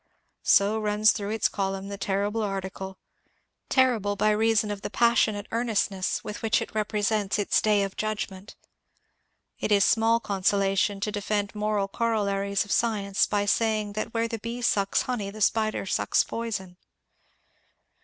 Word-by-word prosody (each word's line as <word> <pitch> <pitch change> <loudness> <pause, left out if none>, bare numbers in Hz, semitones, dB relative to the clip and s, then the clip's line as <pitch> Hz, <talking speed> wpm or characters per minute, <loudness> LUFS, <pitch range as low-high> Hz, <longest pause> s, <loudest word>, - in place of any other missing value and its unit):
So 205 +2 +3
runs 210 +1 +3
through 205 -2 -4
its 220 0 +1
column 195 0 -3
the 200 - -5
terrible 205 +3 -1
article, 190 -1 -4 0.4
— - - -43 0.3
terrible 235 -6 +2
by 210 +1 +2
reason 215 0 +2
of 205 -1 -5
the - - -4
passionate 220 -3 +2
earnestness 215 -5 -1
with 210 - -6
which 225 -1 +2
it - - -6
repre 210 -1 -1
sents 210 -2 0
its 205 - +2
day 210 -2 +3
of 195 -1 -4
judgment. 210 -2 -4 1.0
It - - -2
is 200 -1 +5
small 225 +1 +3
consolation 195 -1 0
to 210 - -1
defend 205 0 -2
moral 210 -1 -1
corollaries 200 -3 0
of 205 - -9
science 205 -4 +1
by 205 -1 0
saying 215 -1 +1
that 215 +2 -4
where 230 0 0
the 230 -1 -5
bee 235 +3 -5
sucks 200 -3 +2
honey 230 -6 -3
the 215 +2 -10
spider 215 0 +1
sucks - - +1
poison. 200 -6 -5
210 Hz, 155 wpm, -26 LUFS, 200-220 Hz, 1.0 s, is